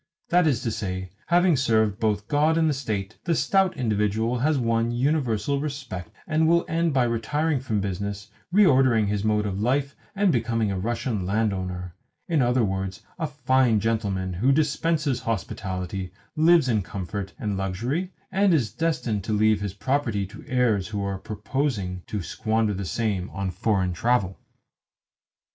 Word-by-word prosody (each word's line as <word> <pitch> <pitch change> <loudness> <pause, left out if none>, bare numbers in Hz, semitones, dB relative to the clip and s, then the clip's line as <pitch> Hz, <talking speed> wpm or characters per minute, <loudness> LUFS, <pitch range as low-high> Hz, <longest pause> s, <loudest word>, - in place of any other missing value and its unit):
That 175 -1 +4
is 135 -4 +1
to 115 - -1
say, 95 -3 -4 0.2
having 175 -1 +4
served 110 -5 +2
both 105 -2 0
God 155 +2 +2
and 160 -1 +3
the 150 - +2
State, 110 -6 -4
the 170 -1 +2
stout 190 +3 +2
individual 110 +1 0
has 150 +3 +2
won 115 -2 +1
universal 135 0 0
respect, 135 - -5 0.2
and 160 0 +2
will 170 +1 +3
end 165 0 +1
by 135 -3 +3
retiring 135 +6 0
from 110 -5 -1
business, 100 +1 -4 0.2
reordering 130 - +4
his 105 -1 -1
mode 105 -1 +1
of 100 -1 -2
life, 140 +4 0 0.2
and 200 -2 +3
becoming 115 -4 0
a 95 - -2
Russian 115 0 -2
landowner 95 -4 -1 0.3
in 160 -4 +2
other 125 0 +3
words, 95 -2 -3 0.2
a 160 - 0
fine 130 -5 +2
gentleman 100 -4 -1
who 115 +10 +2
dispenses 150 -1 +1
hospitality, 95 -3 -4 0.2
lives 160 -2 +5
in 110 -4 +2
comfort 100 +1 -5
and 105 -2 -2
luxury, 120 - -2 0.2
and 195 -2 +3
is 125 -8 0
destined 125 - -1
to 110 - -1
leave 105 0 +3
his 100 -2 -4
property 115 -2 0
to 95 - -12
heirs 125 -8 +1
who 105 -2 -3
are 100 -1 -3
purposing 105 -3 -2
to 105 -4 -3
squander 110 +3 0
the 95 0 -4
same 100 +1 -1
on 95 -1 -3
foreign 95 -1 0
travel. 100 -1 0
115 Hz, 160 wpm, -25 LUFS, 100-140 Hz, 0.3 s, lives